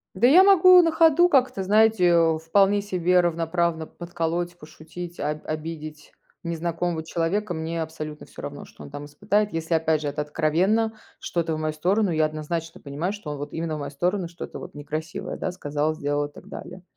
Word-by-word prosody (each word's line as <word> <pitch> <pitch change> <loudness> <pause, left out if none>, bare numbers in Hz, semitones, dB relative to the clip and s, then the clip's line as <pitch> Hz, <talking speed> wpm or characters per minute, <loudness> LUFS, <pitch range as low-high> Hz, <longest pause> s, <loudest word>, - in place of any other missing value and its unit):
Да, 220 +6 +4
я 355 +8 +8
могу 370 -2 +8
на 330 -1 +2
ходу 330 +2 +5
как-то, 255 - +2
знаете, 215 0 +4
э, 165 -2 +4
вполне 195 +5 +3
себе 180 -2 +2
равноправно 170 -1 0
подколоть, 175 0 -4
пошутить, 165 +3 -10
об 150 +1 -3
обидеть 155 -1 -6 0.3
незнакомого 170 0 -2
человека. 175 +4 -1
Мне 165 +1 -3
абсолютно 155 -1 -6
всё - - -12
равно, - - -7
что - - -15
он 70 - -10
там 145 0 -7
испытает. 205 +7 0
Если, 165 +1 -3
опять 160 -1 +1
же, 145 - -2
это 145 +1 -3
откровенно 175 +9 +1 0.3
что-то 165 -2 -2
в - - -4
мою 155 0 -1
сторону, 185 +6 +1
я 155 -1 +2
однозначно 160 +2 -5
понимаю, 150 +7 -3
что 185 -8 -7
он 145 - -5
вот 145 +1 -6
именно 160 -1 -2
в - - -6
мою 140 -1 -5
сторону 175 +4 -1
что-то 175 - -8
вот 180 - -10
некрасивое, 155 +2 -5
да, 185 - -2
сказал, 150 -1 -2
сделал 145 -2 -1
и 145 - -15
так - - -14
далее. 180 0 -9
165 Hz, 185 wpm, -24 LUFS, 155-185 Hz, 0.3 s, я